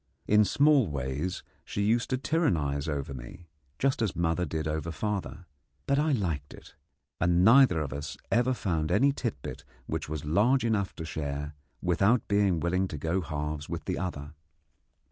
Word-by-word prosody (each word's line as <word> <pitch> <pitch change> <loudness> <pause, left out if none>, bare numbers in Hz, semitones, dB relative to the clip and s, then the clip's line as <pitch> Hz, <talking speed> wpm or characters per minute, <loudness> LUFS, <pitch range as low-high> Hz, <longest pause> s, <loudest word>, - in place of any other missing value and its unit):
In 105 0 +5
small 140 +2 +4
ways 70 +5 -3 0.2
she 100 - -3
used 115 +3 +1
to 130 - +1
tyrannize 80 - 0
over 70 -2 -3
me, 65 +8 -10 0.3
just 135 -1 +1
as 110 -5 0
mother 85 +1 0
did 80 +1 -3
over 80 +1 -2
father; 100 0 -4 0.4
but 140 +1 +2
I 155 +1 +2
liked 85 - -2
it, - - -15 0.5
and 90 +1 +3
neither 120 -6 +6
of 70 -3 -4
us 70 +1 -5
ever 125 +2 +3
found 80 -8 -1
any 135 +9 +4
tit 120 - -3
bit - - -7 0.2
which - - -4
was 75 -2 -4
large 115 - +3
enough 105 -4 0
to 80 - -6
share 75 -1 -4 0.3
without 100 +7 +2
being 100 -4 +2
willing 90 +4 0
to 75 - -6
go 80 +6 -1
halves 75 -1 -4
with - - -5
the - - -2
other. 75 -5 -5
90 Hz, 170 wpm, -29 LUFS, 75-110 Hz, 0.5 s, neither